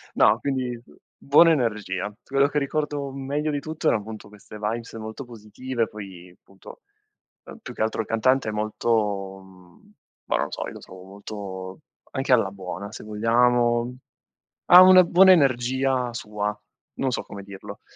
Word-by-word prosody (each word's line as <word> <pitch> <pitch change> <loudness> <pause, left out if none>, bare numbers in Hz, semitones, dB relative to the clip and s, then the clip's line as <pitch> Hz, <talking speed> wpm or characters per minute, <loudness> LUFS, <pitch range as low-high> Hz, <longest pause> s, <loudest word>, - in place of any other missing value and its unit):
No, 110 +3 +4
quindi 125 -4 -3 0.4
buona 165 +4 +5
energia. 105 -8 -1
Quello 140 +1 +2
che 145 +1 -3
ricordo 145 -1 -3
meglio 140 +3 -3
di 145 - -2
tutto 155 +2 -4
erano 105 - +2
appunto 110 0 -10
queste 105 0 -14
vibes 115 +3 -4
molto 110 +4 -7
positive, 115 +1 -4
poi 95 -4 -11
appunto, 95 - -16 0.6
ehm, - - -12
più 125 - -9
che - - -7
altro 110 0 -1
il - - -8
cantante 125 +2 +1
è - - -2
molto 105 -2 -1
mhmm, 90 -2 -20 0.3
ma - - -1
non - - 0
lo - - -10
so, - - -4
io - - -8
lo - - -10
trovo 95 0 -13
molto 95 -1 -8 0.3
anche 135 0 0
alla 115 -6 +3
buona 100 +1 -7
se - - -9
vogliamo. 120 +2 +1 0.7
Ha 180 +1 +10
una 185 0 +8
buona 185 +2 +6
energia 130 -3 +1
sua, 105 -2 -4 0.4
non 130 - -1
so - - -2
come 100 -1 -10
dirlo, 100 -1 -10
115 Hz, 165 wpm, -24 LUFS, 105-135 Hz, 0.7 s, Ha